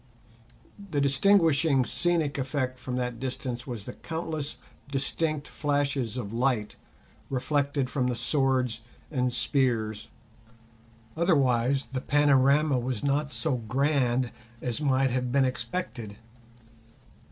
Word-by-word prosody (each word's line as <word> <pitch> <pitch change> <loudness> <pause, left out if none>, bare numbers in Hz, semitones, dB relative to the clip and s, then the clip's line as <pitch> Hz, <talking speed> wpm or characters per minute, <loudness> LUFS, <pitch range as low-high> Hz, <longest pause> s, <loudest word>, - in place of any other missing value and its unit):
The 145 - 0
distinguishing 150 -2 +4
scenic 165 -4 0
effect 130 -1 -2
from 125 0 -4
that 125 -2 -2
distance 125 -1 -4
was 120 -5 -5
the 125 - -7
countless 160 -3 -4 0.3
distinct 145 +2 -1
flashes 140 -5 -1
of 110 -4 -5
light 120 -3 0 0.5
reflected 140 +1 0
from 130 -1 0
the 125 - 0
swords 130 -2 +1 0.3
and 125 -3 +1
spears, 120 -5 0 1.1
otherwise 135 -6 +2
the 130 - -1
panorama 145 0 +4
was 125 -2 -3
not 145 +1 +1
so 125 +2 -1
grand 130 +1 +1 0.3
as 125 +3 -3
might 135 -2 +2
have 125 0 -1
been 135 0 +4
expected. 120 - -4
135 Hz, 110 wpm, -28 LUFS, 125-145 Hz, 1.1 s, distinguishing